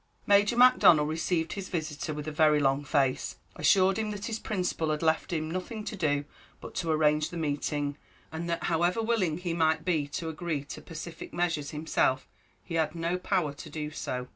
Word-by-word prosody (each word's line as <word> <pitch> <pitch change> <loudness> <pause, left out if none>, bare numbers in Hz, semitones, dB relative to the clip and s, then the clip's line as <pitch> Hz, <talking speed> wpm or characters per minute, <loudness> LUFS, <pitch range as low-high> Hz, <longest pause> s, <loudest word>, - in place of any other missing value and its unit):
Major 205 +3 +4
Macdonnel 245 -11 +7
received 160 +1 -1
his 195 -2 -6
visitor 155 -3 -3
with 150 0 -5
a - - -2
very 150 0 +4
long 135 0 +2
face, 135 -2 0 0.2
assured 190 0 +4
him 215 -1 -1
that 205 -1 -5
his 220 -1 -3
principal 180 -6 -2
had 155 +1 -1
left 160 +2 +1
him 155 -1 -2
nothing 185 +5 -4
to 210 - -5
do 145 -6 0 0.3
but - - -9
to 170 -3 -2
arrange 155 -1 +2
the 175 - -7
meeting, 145 -1 -2 0.3
and 165 +2 -4
that 170 - -2
however 175 +4 +1
willing 205 -9 +1
he 175 -1 -3
might 160 -1 +1
be 160 -6 +1
to 160 +3 -4
agree 160 -2 -3
to 145 - -9
pacific 165 0 -8
measures 170 -4 0
himself, 150 -3 0 0.4
he 175 - -8
had 160 -1 0
no 170 +2 -1
power 180 -6 0
to 155 - -10
do 150 0 -5
so. 125 -4 -4
160 Hz, 190 wpm, -29 LUFS, 150-180 Hz, 0.4 s, Macdonnel